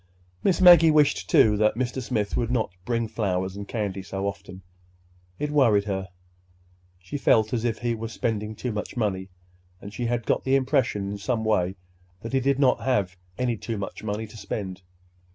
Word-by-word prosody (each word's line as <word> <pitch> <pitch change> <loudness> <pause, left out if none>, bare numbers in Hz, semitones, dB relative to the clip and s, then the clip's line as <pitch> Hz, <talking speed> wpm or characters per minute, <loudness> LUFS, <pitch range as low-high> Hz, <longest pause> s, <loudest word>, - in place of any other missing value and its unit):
Miss 190 - +2
Maggie 175 -3 +8
wished, 150 -2 +3
too, 105 -1 +5
that 105 0 +2
Mr. 130 +2 -2
Smith 110 -4 -2
would 120 -2 0
not 115 -6 0
bring 115 -1 -1
flowers 95 -4 -2
and 100 0 -7
candy 100 -4 -3
so 95 +1 -5
often. 95 -2 -6 0.7
It 150 0 -3
worried 115 -9 +4
her. 95 -2 -3 0.9
She 90 +10 -6
felt 110 -4 +3
as 120 -1 -1
if 115 -2 0
he 120 -1 -1
were 115 0 -4
spending 110 -1 -3
too 125 +3 -4
much 105 +3 -5
money—and 90 -2 -6
she 120 +2 -2
had 120 -1 -1
got - - +1
the 135 0 +2
impression 130 -7 +1
in 100 - -5
some 110 +1 -1
way 95 -4 +1 0.5
that 115 +4 -7
he 135 - +3
did 135 +1 +1
not 135 -3 +3
have 100 -8 0 0.2
any 125 -2 0
too 115 +1 -4
much 100 -1 -6
money 105 +1 -3
to 110 +1 -13
spend. 100 -2 -5
110 Hz, 185 wpm, -25 LUFS, 100-125 Hz, 0.9 s, Maggie